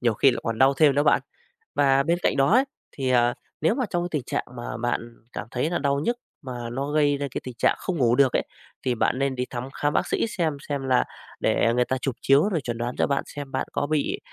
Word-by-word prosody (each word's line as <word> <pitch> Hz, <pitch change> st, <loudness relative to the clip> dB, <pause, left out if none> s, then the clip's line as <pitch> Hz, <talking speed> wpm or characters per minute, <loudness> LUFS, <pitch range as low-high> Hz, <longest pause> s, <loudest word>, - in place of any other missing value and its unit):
nhiều 120 Hz, -2 st, +2 dB
khi 135 Hz, -, +5 dB
lại -, -, -3 dB
còn 115 Hz, -1 st, -2 dB
đau 135 Hz, +1 st, +5 dB
thêm 145 Hz, -1 st, +5 dB
nữa 145 Hz, -, +3 dB
bạn. 150 Hz, -, +4 dB, 0.6 s
Và 135 Hz, -1 st, +4 dB
bên 170 Hz, +4 st, +1 dB
cạnh -, -, +1 dB
đó 135 Hz, +4 st, +3 dB
ấy, 255 Hz, +3 st, +6 dB, 0.3 s
thì, 130 Hz, -2 st, -2 dB
à, 120 Hz, -1 st, +4 dB, 0.3 s
nếu 165 Hz, +8 st, +3 dB
mà 255 Hz, -2 st, 0 dB
trong 175 Hz, -1 st, 0 dB
cái 175 Hz, -, -2 dB
tình 150 Hz, -5 st, -1 dB
trạng -, -, -2 dB
mà 120 Hz, -2 st, -5 dB
bạn 120 Hz, 0 st, -2 dB, 0.2 s
cảm 105 Hz, -, -5 dB
thấy 130 Hz, +6 st, 0 dB
là 175 Hz, -, 0 dB
đau 140 Hz, 0 st, +1 dB
nhức, 235 Hz, +10 st, 0 dB, 0.2 s
mà 125 Hz, -4 st, -6 dB
nó 135 Hz, +4 st, -3 dB
gây 145 Hz, -1 st, +3 dB
ra 140 Hz, 0 st, -2 dB
cái -, -, -4 dB
tình 125 Hz, -2 st, -7 dB
trạng -, -, +3 dB
không 180 Hz, -3 st, -3 dB
ngủ 120 Hz, -3 st, +3 dB
được 135 Hz, -1 st, +4 dB
ấy, -, -, +2 dB, 0.4 s
thì 125 Hz, -2 st, +1 dB
bạn 125 Hz, +3 st, +1 dB
nên 135 Hz, -1 st, 0 dB
đi 125 Hz, 0 st, -1 dB
thăm 125 Hz, +1 st, -5 dB
khám 145 Hz, 0 st, 0 dB
bác -, -, +1 dB
sĩ -, -, 0 dB
xem 165 Hz, -9 st, -1 dB
xem 140 Hz, -1 st, -1 dB
là 130 Hz, -1 st, +4 dB, 0.4 s
để 115 Hz, -, +2 dB
người 125 Hz, 0 st, +3 dB
ta 130 Hz, -, -1 dB
chụp 130 Hz, -1 st, -3 dB
chiếu 140 Hz, +9 st, +4 dB
rồi 165 Hz, -7 st, -1 dB
chuẩn 120 Hz, -2 st, -4 dB
đoán 120 Hz, +1 st, -3 dB
cho -, -, +1 dB
bạn 140 Hz, -1 st, 0 dB
xem 145 Hz, -2 st, -8 dB
bạn 130 Hz, -, -2 dB
có 145 Hz, -, -1 dB
bị 155 Hz, -2 st, 0 dB
135 Hz, 270 wpm, -25 LUFS, 125-145 Hz, 0.6 s, ấy